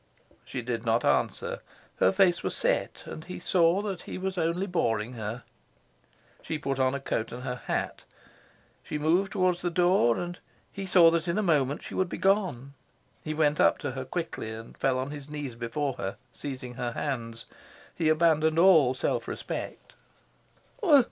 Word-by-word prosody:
She 125 Hz, -, -5 dB
did 115 Hz, -1 st, -3 dB
not 115 Hz, 0 st, +1 dB
answer. -, -, +1 dB, 0.4 s
Her -, -, +4 dB
face 190 Hz, -3 st, +3 dB
was -, -, -2 dB
set, -, -, 0 dB
and 155 Hz, -, -7 dB
he 180 Hz, -, -6 dB
saw 180 Hz, +2 st, +3 dB
that 195 Hz, -4 st, -3 dB
he -, -, -6 dB
was 190 Hz, 0 st, -3 dB
only 170 Hz, +2 st, 0 dB
boring 120 Hz, -, 0 dB
her. 115 Hz, +1 st, -5 dB, 1.0 s
She 155 Hz, -, -3 dB
put 135 Hz, -2 st, -2 dB
on 130 Hz, +1 st, +2 dB
a -, -, -2 dB
coat 115 Hz, -4 st, -2 dB
and 120 Hz, +2 st, -7 dB
her 125 Hz, -2 st, -4 dB
hat. -, -, -2 dB, 0.8 s
She 150 Hz, -, -4 dB
moved 170 Hz, +6 st, +2 dB
towards 185 Hz, -3 st, +1 dB
the 175 Hz, -, 0 dB
door, 175 Hz, -8 st, +3 dB
and 175 Hz, 0 st, -5 dB, 0.3 s
he 195 Hz, -1 st, -6 dB
saw 175 Hz, -3 st, +7 dB
that 165 Hz, +1 st, 0 dB
in 170 Hz, -, 0 dB
a 215 Hz, -, +1 dB
moment 145 Hz, -5 st, +1 dB
she -, -, -8 dB
would 185 Hz, -1 st, 0 dB
be -, -, -4 dB
gone. 185 Hz, -, +1 dB, 0.5 s
He 155 Hz, 0 st, -3 dB
went 150 Hz, -1 st, +2 dB
up -, -, +5 dB
to 145 Hz, -, -4 dB
her 130 Hz, 0 st, -4 dB
quickly 165 Hz, -7 st, -4 dB
and 110 Hz, +1 st, -9 dB
fell 130 Hz, -1 st, +1 dB
on 130 Hz, +2 st, -3 dB
his 145 Hz, -1 st, -8 dB
knees 145 Hz, -4 st, -5 dB
before 120 Hz, +5 st, -2 dB
her, 95 Hz, 0 st, -3 dB, 0.2 s
seizing 130 Hz, -3 st, -6 dB
her 120 Hz, -1 st, -3 dB
hands: 115 Hz, -5 st, -3 dB, 0.5 s
he 160 Hz, -2 st, +1 dB
abandoned 155 Hz, 0 st, +3 dB
all 165 Hz, -8 st, +6 dB
self -, -, -1 dB
respect. -, -, -6 dB
150 Hz, 175 wpm, -28 LUFS, 125-175 Hz, 1.0 s, saw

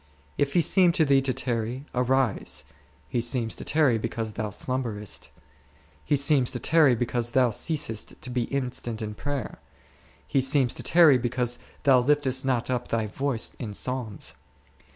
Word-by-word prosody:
If 140 Hz, 0 st, 0 dB
He 175 Hz, -, +4 dB
seem 175 Hz, +2 st, +4 dB
to 160 Hz, -, +3 dB
thee 135 Hz, -1 st, +4 dB
to 135 Hz, -1 st, 0 dB
tarry, 120 Hz, +2 st, -2 dB
arise; 125 Hz, -2 st, 0 dB, 0.4 s
He 120 Hz, -, -1 dB
seems 120 Hz, -1 st, +1 dB
to -, -, -7 dB
tarry 145 Hz, -7 st, +2 dB
because 115 Hz, -1 st, -4 dB
thou 110 Hz, 0 st, -3 dB
slumberest; 110 Hz, -2 st, -3 dB, 0.7 s
He 145 Hz, -, +1 dB
seems 140 Hz, -2 st, +3 dB
to -, -, -5 dB
tarry 150 Hz, -6 st, +4 dB
because 120 Hz, 0 st, -1 dB
thou 125 Hz, 0 st, +3 dB
ceasest 145 Hz, -3 st, -1 dB
to 130 Hz, -, -5 dB
be 125 Hz, -1 st, -1 dB
instant 125 Hz, -4 st, -3 dB
in 105 Hz, 0 st, -5 dB
prayer; 140 Hz, +4 st, -5 dB, 0.7 s
He 135 Hz, -, +1 dB
seems 130 Hz, -1 st, +2 dB
to -, -, -2 dB
tarry 160 Hz, -7 st, +5 dB
because 120 Hz, 0 st, -1 dB, 0.2 s
thou 135 Hz, -2 st, +5 dB
liftest 135 Hz, 0 st, +1 dB
not 130 Hz, -3 st, 0 dB
up 125 Hz, -1 st, -2 dB
thy 115 Hz, -1 st, -1 dB
voice 125 Hz, +2 st, -2 dB
in 105 Hz, -4 st, -6 dB
Psalms. 125 Hz, -5 st, -3 dB
125 Hz, 160 wpm, -26 LUFS, 115-140 Hz, 0.7 s, tarry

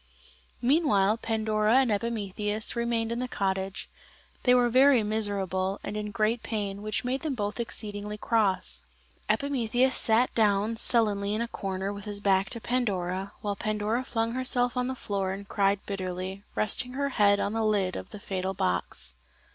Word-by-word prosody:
Meanwhile 230 Hz, -, +3 dB
Pandora 220 Hz, -1 st, +1 dB
and 265 Hz, -4 st, +3 dB
Epimetheus 210 Hz, 0 st, -1 dB
remained 235 Hz, -1 st, -1 dB
in 235 Hz, -, -2 dB
the 250 Hz, -, -2 dB
cottage: 190 Hz, -3 st, -2 dB, 0.6 s
they 250 Hz, -1 st, +6 dB
were 245 Hz, -1 st, +4 dB
very 255 Hz, 0 st, +5 dB
miserable 200 Hz, -3 st, -1 dB
and 205 Hz, -, -5 dB
in 210 Hz, 0 st, -3 dB
great 215 Hz, +3 st, 0 dB
pain, 200 Hz, -3 st, -3 dB
which 215 Hz, +3 st, -2 dB
made 255 Hz, +2 st, -1 dB
them 300 Hz, -4 st, -2 dB
both 210 Hz, 0 st, -3 dB
exceedingly 210 Hz, -2 st, -2 dB
cross. 210 Hz, -4 st, +1 dB, 0.5 s
Epimetheus 260 Hz, -2 st, +1 dB
sat 230 Hz, +3 st, +3 dB
down 210 Hz, 0 st, +2 dB
sullenly 210 Hz, -3 st, +3 dB
in 220 Hz, -, -1 dB
a 235 Hz, -, -1 dB
corner 195 Hz, -2 st, -4 dB
with 200 Hz, -1 st, -9 dB
his 205 Hz, -1 st, -2 dB
back 195 Hz, -1 st, +2 dB
to 230 Hz, -, -3 dB
Pandora, 195 Hz, -6 st, -2 dB
while 205 Hz, -1 st, -2 dB
Pandora 215 Hz, +3 st, -1 dB
flung 230 Hz, -3 st, -1 dB
herself 245 Hz, 0 st, +1 dB
on 250 Hz, 0 st, 0 dB
the 260 Hz, -, -3 dB
floor 195 Hz, -5 st, -2 dB
and 200 Hz, +1 st, -8 dB
cried 200 Hz, -1 st, +1 dB
bitterly, 185 Hz, 0 st, -4 dB
resting 245 Hz, +4 st, 0 dB
her 280 Hz, +1 st, -1 dB
head 205 Hz, -5 st, +3 dB
on 205 Hz, -, -1 dB
the 225 Hz, 0 st, 0 dB
lid 200 Hz, -4 st, +1 dB
of -, -, -6 dB
the 210 Hz, -, -9 dB
fatal 190 Hz, -1 st, -3 dB
box. 90 Hz, -, 0 dB
210 Hz, 165 wpm, -28 LUFS, 200-235 Hz, 0.6 s, they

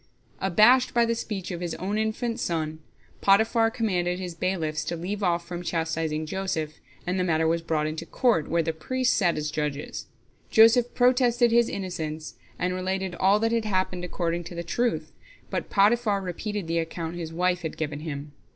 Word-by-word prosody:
Abashed 215 Hz, +9 st, +4 dB
by 235 Hz, 0 st, +5 dB
the 230 Hz, -, +1 dB
speech 205 Hz, -5 st, -4 dB
of 175 Hz, -1 st, -5 dB
his 175 Hz, -2 st, -3 dB
own 200 Hz, +3 st, -2 dB
infant 225 Hz, +2 st, -1 dB
son, 155 Hz, -5 st, -2 dB, 0.4 s
Potiphar 225 Hz, +3 st, +4 dB
commanded 180 Hz, -6 st, 0 dB
his 180 Hz, -2 st, -5 dB
bailiffs 165 Hz, -3 st, -1 dB
to 170 Hz, -, -2 dB
leave 190 Hz, +5 st, -4 dB
off 170 Hz, -2 st, 0 dB
from 175 Hz, 0 st, -5 dB
chastising 160 Hz, -2 st, -1 dB
Joseph, 160 Hz, -3 st, -3 dB, 0.3 s
and 180 Hz, +1 st, -1 dB
the -, -, +2 dB
matter 160 Hz, -2 st, +2 dB
was 165 Hz, +1 st, +1 dB
brought 160 Hz, -2 st, 0 dB
into 155 Hz, +2 st, -4 dB
court, 230 Hz, -, +1 dB
where 170 Hz, 0 st, +2 dB
priests 250 Hz, +11 st, 0 dB
sat 175 Hz, -6 st, +2 dB
as 150 Hz, 0 st, -2 dB
judges. 150 Hz, -1 st, -3 dB, 0.4 s
Joseph 230 Hz, +2 st, +5 dB
protested 245 Hz, -1 st, +4 dB
his 235 Hz, 0 st, +4 dB
innocence, 160 Hz, -5 st, -4 dB, 0.2 s
and 180 Hz, +1 st, -1 dB
related 190 Hz, 0 st, -2 dB
all 190 Hz, +3 st, +3 dB
that 225 Hz, 0 st, +2 dB
had 230 Hz, -1 st, 0 dB
happened 185 Hz, -3 st, -1 dB
according 175 Hz, -1 st, -2 dB
to 175 Hz, -, -8 dB
the 170 Hz, -, -4 dB
truth, 240 Hz, +8 st, -1 dB, 0.4 s
but -, -, -3 dB
Potiphar 210 Hz, 0 st, +3 dB
repeated 195 Hz, +2 st, -4 dB
the 165 Hz, +1 st, 0 dB
account 165 Hz, 0 st, -4 dB
his 165 Hz, -2 st, -5 dB
wife 180 Hz, +2 st, 0 dB
had 160 Hz, -2 st, -5 dB
given 150 Hz, -2 st, -3 dB
him. 150 Hz, -2 st, -6 dB
180 Hz, 180 wpm, -26 LUFS, 165-215 Hz, 0.4 s, by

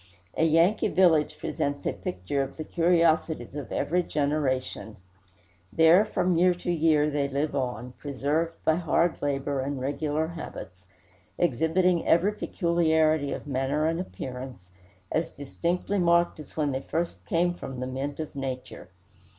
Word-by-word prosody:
A 160 Hz, -, +2 dB
Yankee 165 Hz, +6 st, +3 dB
village 165 Hz, -5 st, +3 dB
presents 145 Hz, -2 st, -3 dB
a -, -, 0 dB
picture 95 Hz, +10 st, -3 dB
of 135 Hz, 0 st, -5 dB
the 155 Hz, -, -4 dB
curiosities 165 Hz, -6 st, +1 dB
of 145 Hz, -2 st, -6 dB
every 180 Hz, +4 st, +1 dB
generation: 140 Hz, -8 st, -2 dB, 0.7 s
there 165 Hz, +5 st, +6 dB
from 180 Hz, -4 st, 0 dB
year 180 Hz, +1 st, +4 dB
to 175 Hz, 0 st, -3 dB
year, 155 Hz, -3 st, +3 dB
they 145 Hz, -1 st, 0 dB
live 140 Hz, +1 st, -2 dB
on, 125 Hz, -2 st, -3 dB
preserved 150 Hz, +4 st, -1 dB
by 160 Hz, 0 st, +3 dB
hard 170 Hz, 0 st, +1 dB
labor 140 Hz, -1 st, -1 dB
and 135 Hz, +1 st, -3 dB
regular 150 Hz, +4 st, -1 dB
habits, 90 Hz, -, -9 dB, 0.5 s
exhibiting 170 Hz, +4 st, +2 dB
every 180 Hz, +6 st, +4 dB
peculiarity 160 Hz, -6 st, +1 dB
of -, -, -5 dB
manner 140 Hz, +2 st, 0 dB
and 165 Hz, +1 st, 0 dB
appearance, 125 Hz, -, -7 dB, 0.4 s
as 160 Hz, +1 st, 0 dB
distinctly 175 Hz, +7 st, -2 dB
marked 170 Hz, -1 st, +3 dB
as 150 Hz, -, -12 dB
when 150 Hz, -2 st, +1 dB
they 130 Hz, 0 st, -2 dB
first 165 Hz, -, -3 dB
came 175 Hz, +1 st, +2 dB
from 135 Hz, -7 st, -7 dB
the 130 Hz, -, -2 dB
mint 135 Hz, +3 st, -4 dB
of 155 Hz, -2 st, -5 dB
nature. 130 Hz, -8 st, -6 dB
155 Hz, 145 wpm, -27 LUFS, 135-170 Hz, 0.7 s, there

